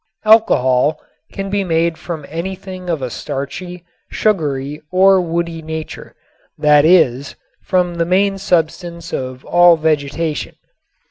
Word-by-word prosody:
Alcohol 150 - +3 0.3
can 195 0 -5
be 200 -1 0
made 165 -1 0
from 160 -3 -7
anything 185 +2 -6
of 160 -6 -2
a 125 - -3
starchy, 170 +6 -6 0.2
sugary 150 -8 -1
or 190 +1 +5
woody 170 -1 -3
nature, 160 0 -7 0.4
that 150 0 +4
is, 140 -6 +3 0.3
from 180 -1 0
the 170 0 -1
main 195 +2 +1
substance 170 -2 -2
of 130 0 -5
all 175 -1 +5
vegetation. 155 0 -2
170 Hz, 120 wpm, -17 LUFS, 150-185 Hz, 0.4 s, or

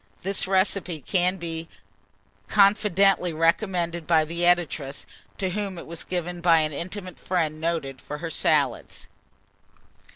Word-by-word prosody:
This 195 0 +1
recipe 190 -3 +1
can 180 +5 0
be 165 -2 -6 0.8
confidently 195 -3 +3
recommended 170 0 0
by 160 -2 +4
the 170 +2 -5
editress, 160 -6 0 0.3
to 190 -2 -1
whom 200 -1 -3
it - - -8
was 165 0 -6
given 175 -1 -4
by 165 -2 +5
an 155 -1 -2
intimate 185 +3 -6
friend 160 -4 -1
noted 160 -6 -2
for 150 - -6
her 165 +1 -5
salads. 140 -7 0
170 Hz, 130 wpm, -25 LUFS, 160-185 Hz, 0.8 s, by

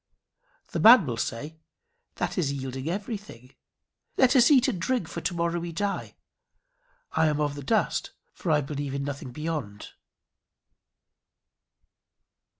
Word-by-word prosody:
The - - -3
man 225 -4 +8
will 120 -4 -2
say, 145 +8 -4 0.6
"That - - -2
is 160 -7 0
yielding 135 +1 -4
everything. 195 - -6 0.6
Let 260 +1 +4
us 245 -2 +6
eat 265 -3 +5
and 200 -10 -2
drink, 245 -3 0
for 145 - -6
to - - -1
morrow 170 0 0
we 170 0 -5
die. 200 +4 -3 1.0
I 160 - +2
am 150 -1 0
of 145 -1 0
the 145 - -7
dust, 135 - 0 0.2
for - - -5
I 150 -1 +4
believe 140 -1 -4
in 140 - -2
nothing 140 -2 -5
beyond." 145 -8 -5
155 Hz, 140 wpm, -27 LUFS, 140-195 Hz, 1.0 s, man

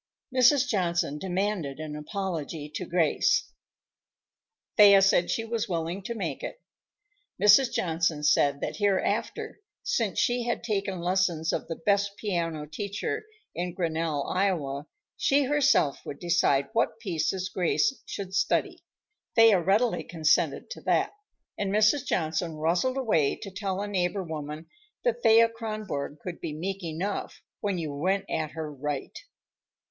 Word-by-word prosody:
Mrs. 260 +2 +5
Johnson 175 - 0
demanded 185 -6 -2
an 155 -1 -5
apology 160 -2 -4
to 180 - -4
Grace. 170 -3 +2 1.2
Thea 200 -2 +8
said 195 -2 +3
she 225 - -1
was 225 -1 -2
willing 170 +2 -2
to 235 +4 -5
make - - -4
it. - - -6 0.8
Mrs. 210 +5 +6
Johnson 165 -5 0
said 140 -1 +3
that - - -3
hereafter, 205 - -1 0.2
since 480 - -1
she 245 0 +1
had 240 0 -2
taken 195 -5 -2
lessons 175 -2 +1
of - - -2
the 165 - -4
best 200 +3 0
piano 165 -7 -2
teacher 200 - -4 0.3
in 175 0 -4
Grinnell, 160 -4 -1
Iowa, 155 -7 -1 0.3
she 280 +1 +3
herself 275 - +2
would 140 - -7
decide 170 -6 +2
what 230 - +1
pieces 185 -2 -1
Grace 185 +9 +1
should 190 -2 -6
study. 195 - 0 0.5
Thea 225 -4 +7
readily 205 +7 +2
consented 160 - +1
to - - -7
that, - - +1 0.5
and 200 -1 -1
Mrs. 215 +6 +3
Johnson 160 0 -1
rustled 175 +12 0
away 210 - +2
to 195 - -9
tell 190 -1 -3
a 205 - -3
neighbor 190 0 -1
woman 155 -1 -6 0.4
that 240 0 0
Thea 230 0 +6
Kronborg 215 -11 -5
could 180 -2 -6
be 155 - -4
meek 190 +5 -4
enough 170 +5 -4 0.2
when 200 -3 -1
you 155 -4 -3
went 190 +7 0
at 155 -1 -2
her 155 -2 -5
right. 145 0 -4
185 Hz, 140 wpm, -27 LUFS, 160-210 Hz, 1.2 s, Thea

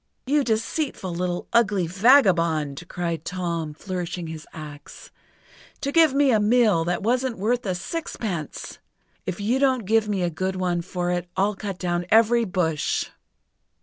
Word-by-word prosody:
"You 285 +2 +2
deceitful, 225 - -2
little, 175 0 -2
ugly 210 -6 +3
vagabond!" 170 - +3
cried 170 -2 -3
Tom, 170 -4 -3
flourishing 180 -1 -4
his 160 -1 -8
axe, 150 -2 -10 0.7
"to 280 - -2
give 320 -3 +5
me 280 -1 +4
a 220 - +4
mill 210 -5 +3
that 175 +2 -1
wasn't 250 +2 0
worth 230 +3 0
a 185 - 0
sixpence! 190 - -5 0.5
If 185 0 -3
you 230 +6 +1
don't 260 -5 +2
give 220 +1 +2
me 195 -3 0
a 175 - 0
good 185 +4 -2
one 180 -2 0
for 175 0 -3
it, 175 0 -2
I'll 200 +2 +2
cut 195 -2 -5
down 175 -1 -2
every 230 +2 +4
bush!" 170 -6 -1
185 Hz, 150 wpm, -24 LUFS, 175-230 Hz, 0.7 s, give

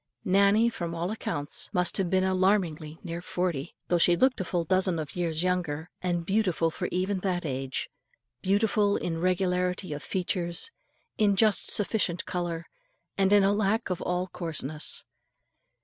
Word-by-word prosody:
Nannie 200 +5 +4
from 170 -5 -4
all 170 +3 -2
accounts 145 -9 -2
must 180 -2 +3
have 190 -3 0
been 185 0 +2
alarmingly 185 -5 +1
near 170 -1 -5
forty, 175 -4 -3
though 175 - +2
she 175 +1 +5
looked 260 +1 +3
a - - 0
full 175 -1 -1
dozen 185 +1 +2
of 155 -3 -5
years 170 -2 -1
younger, 175 -3 -1
and 175 -2 -1
beautiful 185 -5 +1
for 180 +2 -3
even 185 +2 0
that 180 -2 -1
age, 135 -2 -3 0.5
beautiful 205 +1 +2
in 165 -2 -3
regularity 180 -1 0
of 145 - -6
features, 180 - -1 0.5
in 205 -2 +4
just 215 +1 +4
sufficient 200 -4 +2
colour, 170 -2 -3 0.5
and 195 0 +2
in 205 -1 +6
a 195 +1 +3
lack 210 +1 0
of 180 - -2
all 180 0 -1
coarseness. 155 -4 -4
180 Hz, 155 wpm, -28 LUFS, 170-195 Hz, 0.5 s, in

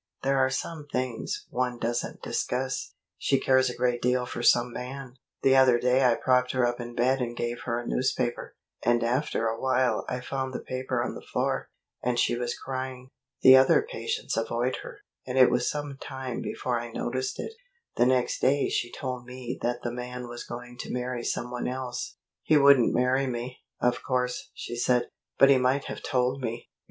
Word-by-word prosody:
There 135 0 +2
are 130 0 +4
some 150 +3 -4
things 125 -2 -3
one 125 -1 -1
doesn't 120 +1 -3
discuss. 130 +1 -2 0.2
She 135 - +2
cares 130 0 +3
a - - -5
great 125 -1 0
deal 125 0 +2
for 120 - -5
some 120 0 +4
man. 130 0 -6 0.3
The 135 0 +5
other 130 -2 +6
day 125 +2 +3
I 120 -2 +5
propped 125 0 +2
her 130 -1 +3
up 120 0 -1
in 120 0 -7
bed 130 +2 +2
and 120 -1 -3
gave 120 0 -2
her 115 -1 -1
a 120 - -7
newspaper, 125 -1 -1 0.3
and 120 -1 +2
after 120 0 0
a 115 0 -3
while 130 -1 +2
I 125 - -2
found 130 0 -4
the - - -2
paper 130 -1 -2
on - - -3
the - - -8
floor, - - -2 0.3
and 125 -1 0
she 120 - +2
was 120 0 -3
crying. 130 -1 -5 0.3
The 130 - +10
other 130 - +5
patients 470 -1 -3
avoid - - 0
her, - - -10 0.3
and 125 +1 -2
it 130 -1 +7
was 125 0 +1
some 145 -2 -4
time 130 -3 -5
before 125 -2 -2
I 120 0 -7
noticed 130 +3 -3
it. - - -5 0.4
The 120 - +4
next 130 -1 +1
day 140 +2 +2
she 120 - -1
told 125 -2 -5
me 125 -1 -6
that 120 0 -1
the 120 - -2
man 125 0 -6
was 120 0 -7
going 120 +1 -8
to - - -5
marry 125 -1 -3
some 120 +1 -2
one 125 -1 -3
else. 125 -1 -4 0.3
'He 155 - +4
wouldn't 140 -4 +6
marry 130 +2 +2
me, 125 +1 -4 0.2
of 125 0 +1
course,' 125 -1 -1
she 120 - -6
said; 125 0 +2 0.3
'but 135 - +7
he 135 - +5
might 130 +2 +2
have - - -6
told 130 +1 0
me.'" 115 -1 -4
125 Hz, 195 wpm, -27 LUFS, 120-130 Hz, 0.4 s, The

